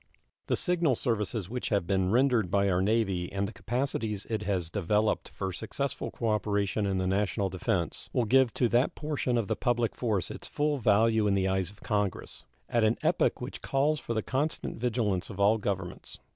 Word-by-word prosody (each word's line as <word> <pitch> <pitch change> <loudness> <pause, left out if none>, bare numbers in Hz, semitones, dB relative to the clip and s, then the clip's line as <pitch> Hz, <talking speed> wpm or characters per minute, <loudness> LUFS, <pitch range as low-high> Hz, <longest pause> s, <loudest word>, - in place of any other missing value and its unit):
The - - +2
signal 170 -7 +2
services 110 -4 -1
which 125 +4 -4
have 100 -5 +1
been 95 0 +1
rendered 120 -4 +3
by 100 +1 +2
our 90 0 +2
Navy 95 -4 +1
and 100 0 -1
the 110 - -8
capacities 115 -4 -2
it 110 -2 0
has 90 -5 -1
developed 105 +3 +1
for 95 -1 -4
successful 140 +9 -3
cooperation 105 -2 0
in 95 -1 0
the 95 - 0
national 100 +1 0
defense 90 -1 -2
will 120 - +1
give 130 +1 +4
to 125 - +3
that 120 +4 +2
portion 145 -5 -1
of 115 - +1
the - - -1
public 120 -2 0
force 105 -8 -1
its - - -7
full 150 -1 0
value 110 0 +3
in 100 - +3
the 95 -1 +1
eyes 95 -2 0
of 105 +1 -17
Congress, 105 -3 -2 0.2
at 115 -1 +1
an 110 +2 +3
epoch - - +2
which - - -6
calls 145 +3 +1
for 115 - -4
the 110 - 0
constant 145 0 -2
vigilance 110 -6 0
of 100 -3 -8
all 105 +3 +4
governments. 95 -4 -4
105 Hz, 190 wpm, -29 LUFS, 95-120 Hz, 0.2 s, give